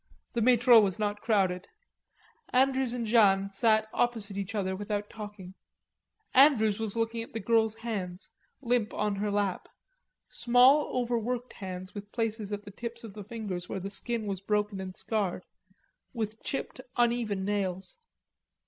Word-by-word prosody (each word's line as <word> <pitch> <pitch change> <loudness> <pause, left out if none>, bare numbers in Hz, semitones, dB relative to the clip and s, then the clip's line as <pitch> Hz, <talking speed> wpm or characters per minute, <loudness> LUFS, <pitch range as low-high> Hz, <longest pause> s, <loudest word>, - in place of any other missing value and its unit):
The 235 - 0
Metro 245 0 +6
was 200 -3 +1
not 205 -1 -2
crowded, 190 -5 +1 0.8
Andrews 265 -1 +2
and 240 -1 -2
Jeanne 200 -3 +4
sat 220 +1 +3
opposite 225 -5 +1
each 200 +2 -4
other 190 -2 -1
without 205 +1 -4
talking. 205 -4 -9 0.8
Andrews 235 -7 +5
was 220 -1 0
looking 230 0 -1
at 230 - -9
the 225 - -3
girl's 220 +1 +2
hands, 195 -6 -5 0.3
limp 240 -3 0
on 210 -1 -1
her 205 +1 -1
lap, 205 -2 -1 0.6
small 250 +5 +4
overworked 245 0 -2
hands 185 -1 -7
with 205 0 -8
places 220 -3 -2
at 205 0 -4
the 205 - -9
tips 235 +3 -6
of 220 -3 -9
the 210 0 -8
fingers 200 -5 -5
where - - -3
the 195 +2 -6
skin 230 +2 -2
was 195 -2 -3
broken 210 -1 -1
and 185 -1 -7
scarred, 200 -5 -2 0.7
with 220 -1 -4
chipped 270 -1 -4 0.2
uneven 235 -5 +1
nails. 195 - -2
215 Hz, 150 wpm, -29 LUFS, 200-235 Hz, 0.8 s, Metro